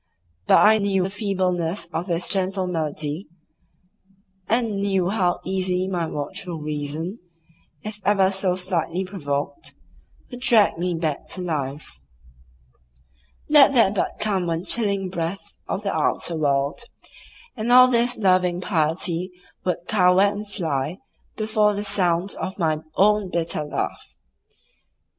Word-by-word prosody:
But - - +6
I 220 +1 +6
knew 195 -2 +1
the 190 - -3
feebleness 185 -4 -1
of 170 +4 -3
this 170 -1 0
gentle 190 -1 +1
malady, 155 0 -3 1.2
and 230 -3 +1
knew 195 -2 0
how 180 -5 +1
easily 185 -1 -1
my 175 -3 -2
watchful 160 +4 -5
reason, 150 +6 -4 0.6
if 210 0 -7
ever 195 -2 +3
so 190 -2 0
slightly 180 -1 0
provoked, 150 - -4 0.6
would 245 - -8
drag 225 -8 +5
me 180 0 -1
back 160 -3 -3
to 185 - -5
life. 145 - -4 1.5
Let 290 -2 +6
there 230 -7 +4
but 200 - -2
come 195 -4 0
one 165 0 -2
chilling 200 -4 +2
breath 180 +3 -5
of 200 - -3
the 195 - -1
outer 160 +2 0
world, 140 0 0 0.8
and 230 0 -2
all 255 +1 +9
this 245 0 +2
loving 185 -3 +2
piety 170 0 -1 0.3
would 175 -1 -2
cower 180 -2 +4
and 205 +1 0
fly 155 -3 -2 0.4
before 215 -1 +1
the 205 - -3
sound 180 -1 +1
of 190 - -4
my 160 -4 0 0.2
own 210 0 +3
bitter 170 -3 -1
laugh. 150 - -5
185 Hz, 130 wpm, -23 LUFS, 165-205 Hz, 1.5 s, all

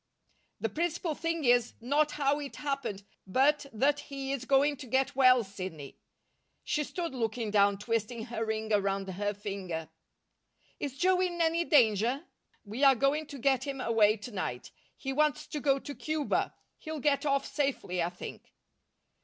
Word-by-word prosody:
"The 225 - -1
principal 335 - -1
thing 330 0 -2
is, 245 -1 +3
not 290 +6 +1
how 285 0 +1
it 285 -2 -6
happened, 270 -9 -3 0.2
but 275 +8 +3
that 280 +6 +2
he 275 -2 -5
is 265 -2 -3
going 280 +2 +3
to 265 -1 -9
get 265 +3 +1
well, 255 -2 +6
Sidney." 185 -8 -8 0.6
She 300 - 0
stood 335 +1 -4
looking 225 -2 -2
down, 200 -1 +4
twisting 225 +2 -2
her 235 -2 -3
ring 220 0 -2
around 195 -1 +1
her 205 +2 -2
finger. 190 -6 -5 0.9
"Is 275 -2 -4
Joe 370 +2 +3
in 350 -2 -1
any 335 +1 +2
danger?" 245 - +3 0.4
"We 220 +7 -4
are 270 -1 +8
going 280 +5 +1
to 285 - -8
get 265 +1 +2
him 275 -1 -4
away 225 -3 +3
to 210 +4 -8
night. 125 - -4 0.3
He 270 - -3
wants 300 +1 +1
to 305 - -5
go 275 -1 +3
to 285 +1 -7
Cuba. 310 0 -1 0.2
He'll 315 -1 -5
get 280 0 +2
off 275 -2 +1
safely, 270 - -1
I 170 - +1
think." 180 - -9
265 Hz, 165 wpm, -30 LUFS, 215-290 Hz, 0.9 s, are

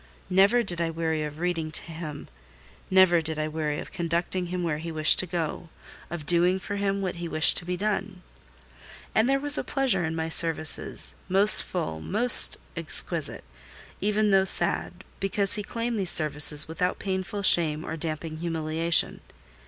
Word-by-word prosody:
Never 200 +6 +2
did 175 -5 -2
I 165 - -3
weary 160 -1 -4
of 150 0 -8
reading 165 -2 -4
to - - -2
him; 160 -3 -10 0.6
never 185 -3 +2
did 160 -1 -6
I 155 0 -4
weary 155 -1 -5
of - - -11
conducting 175 +2 -4
him 180 0 -6
where 155 -3 -4
he 165 +1 -8
wished 155 -1 +2
to 185 - -1
go: 170 -1 -6 0.4
of 170 -3 -9
doing 175 +3 0
for 200 +2 -8
him 200 0 -3
what 185 -2 -6
he 170 0 -7
wished 155 -1 +1
to - - -5
be 180 0 -5
done. 195 -2 -5 0.9
And 220 +4 0
there 275 0 0
was 290 +1 +3
a - - -5
pleasure 265 -10 -2
in 160 0 -5
my 160 0 -5
services, 155 - +1 0.2
most 200 +3 +5
full, 120 - -7
most 240 - +8 0.2
exquisite, - - 0 0.6
even 210 0 -2
though 195 0 +2
sad—because 195 +1 -1
he 210 - -3
claimed 230 +2 -6
these 190 -3 +3
services 150 -1 +6
without 170 +3 -4
painful 190 +1 -6
shame 160 -4 +2
or 160 - -7
damping 155 0 -7
humiliation. 165 0 -2
175 Hz, 170 wpm, -24 LUFS, 160-195 Hz, 0.9 s, most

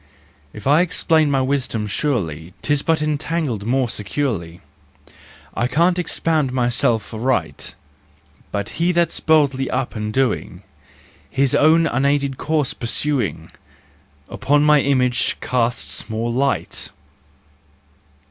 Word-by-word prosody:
If 105 - -11
I 145 +5 +5
explain 160 -3 +2
my 135 -2 +2
wisdom, 130 -5 -1
surely 90 - -2
Tis 145 -2 +1
but 160 -1 +1
entangled 150 -7 -2
more 130 +1 +2
securely, 100 -6 -3 0.9
I 120 - 0
can't 175 +6 +2
expound 160 -5 0
myself 120 -3 0
aright: 110 - -2 0.8
But 100 -1 -3
he 175 +1 +3
that's 170 0 +1
boldly 140 -4 +2
up 130 -1 -2
and 105 0 -3
doing, 130 -1 -1 0.7
His 135 -1 +1
own 160 +2 +5
unaided 140 -1 +1
course 150 -3 0
pursuing, 130 +4 -2 0.8
Upon 145 +1 +1
my 150 -1 +5
image 130 -3 +1
casts 120 -1 -2
more 115 +2 -2
light! 135 +3 -1
135 Hz, 110 wpm, -20 LUFS, 115-150 Hz, 0.9 s, I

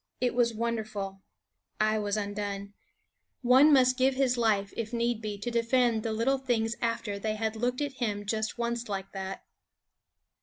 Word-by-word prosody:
It 250 -1 +1
was 235 -1 +3
wonderful; 215 -4 -3 0.6
I 215 0 +2
was 205 0 -1
undone. 200 -1 -4 0.7
One 260 +5 +7
must 255 -2 +5
give 260 +1 +3
his 260 -2 +2
life, 210 -4 +1
if 230 0 -4
need 235 -1 0
be, 210 -2 -4
to 240 +4 -4
defend 235 -1 +2
the 225 - -2
little 245 +5 +1
things 235 -3 0
after 230 -3 -1
they 215 +1 -1
had 220 0 -2
looked 245 +4 -1
at 285 -1 -2
him 205 -3 -1
just 220 +2 -2
once 235 -1 -2
like 195 -1 -4
that. 190 0 -6
225 Hz, 165 wpm, -29 LUFS, 205-245 Hz, 0.7 s, One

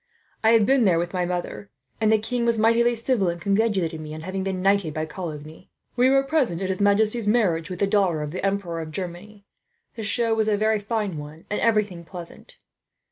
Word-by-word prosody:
I 220 +1 +5
have 225 -2 +5
been 265 0 +3
there 180 -4 +4
with 175 +2 -2
my 180 -1 0
mother, 175 - -4 0.3
and 215 0 +3
the 220 - +5
king 235 +3 -2
was 235 -1 +2
mightily 230 +2 +3
civil, 230 -4 0
and 170 0 -4
congratulated 195 -4 0
me 155 0 -7
on 155 - -7
having 185 +3 -4
been 190 -1 -2
knighted 195 -4 +1
by 155 0 -1
Coligny. 160 -1 -8 0.3
We 250 +1 +4
were 270 0 +4
present 270 - 0
at 190 -1 -3
his 190 +1 -2
majesty's 210 +2 +3
marriage 185 -8 +1
with 180 - -5
the 200 - +2
daughter 195 -6 +1
of 150 - -5
the 185 - -5
Emperor 195 -4 -1
of 160 - -7
Germany. 190 +5 -7 0.5
The 230 - -7
show 230 +2 +1
was 220 -1 +1
a 210 -1 +2
very 215 +1 +1
fine 205 -5 -3
one, 150 +2 -10
and 210 - -1
everything 210 -6 +1
pleasant. 175 - -11
200 Hz, 215 wpm, -24 LUFS, 170-220 Hz, 0.5 s, I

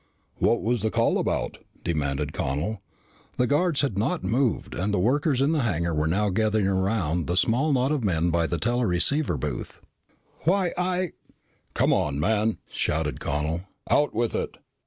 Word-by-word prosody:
"What 115 - +2
was 120 +1 +1
the 110 - +1
call - - +2
about?" - - -1 0.2
demanded 75 -3 -1
Connel. 85 +10 -2 0.6
The 125 - +3
guards 150 +3 +2
had 115 -9 -1
not 170 - 0
moved 125 0 0
and 95 +5 -1
the 100 - +1
workers 135 - +2
in 145 - +2
the 155 -3 +1
hangar 85 -7 0
were 75 0 +1
now 100 +5 +1
gathering 105 0 +1
around 95 -4 0
the 90 - 0
small 130 +10 +2
knot 130 0 +2
of 145 -5 0
men 85 -3 +1
by 85 -1 +1
the 85 - -1
teleceiver 120 - +1
booth. 65 - -5 0.6
"Why 180 +1 +1
I 180 0 0 0.3
" - - -40
"Come - - +3
on, 70 -1 0
man!" 110 +6 +1
shouted 75 -1 -1
Connel. 75 +5 -2 0.3
"Out 145 0 +4
with 115 +1 0
it." - - -3
105 Hz, 170 wpm, -26 LUFS, 85-135 Hz, 0.6 s, Out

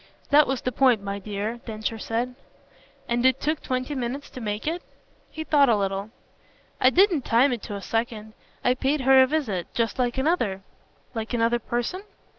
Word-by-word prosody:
"That 295 +1 +6
was 265 -1 -1
the 255 - -1
point, 245 -4 +3
my 200 0 -4
dear," 210 +3 -4
Densher 220 0 -4
said. 235 +4 -2 0.7
"And 240 0 0
it 260 0 +4
took 310 +1 -1
twenty 255 +2 -2
minutes 265 +2 -4
to 255 - -8
make 210 -1 -3
it?" 335 +3 -1 0.5
He 315 - -6
thought 285 -4 +4
a 230 - +5
little. 195 +1 -2 0.7
"I 255 - +6
didn't 355 0 +4
time 245 +3 +3
it 235 - -4
to 205 - -6
a 200 - -7
second. 225 -1 -3 0.3
I 250 - +5
paid 270 +3 0
her 265 +1 +6
the 260 - +5
visit 255 - -1
just 230 +1 -1
like 245 0 0
another." 255 - 0 0.5
"Like 225 +1 -3
another 235 +1 +2
person?" 240 - -3
240 Hz, 185 wpm, -25 LUFS, 220-270 Hz, 0.7 s, That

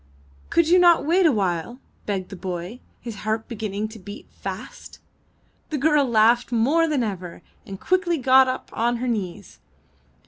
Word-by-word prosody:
''Could 335 -2 +2
you 360 +1 +6
not 345 -3 +5
wait 345 +3 +4
a - - +4
while?'' 195 0 -2 0.3
begged 195 -3 -3
the - - -8
boy, 185 +4 -6 0.2
his 230 -4 -7
heart 220 +1 -3
beginning 215 -2 -4
to 220 0 -11
beat 205 +3 -10
fast. - - -8 0.7
The 305 - -2
girl 295 0 +3
laughed 235 +1 +3
more 280 +9 +2
than 295 -5 0
ever, 180 -5 -6 0.2
and 195 -1 -8
quickly 365 -2 +1
got 260 0 +5
up 255 0 -4
on 235 +2 0
her 250 +2 -3
knees. 200 -7 -4
235 Hz, 165 wpm, -23 LUFS, 200-290 Hz, 0.7 s, you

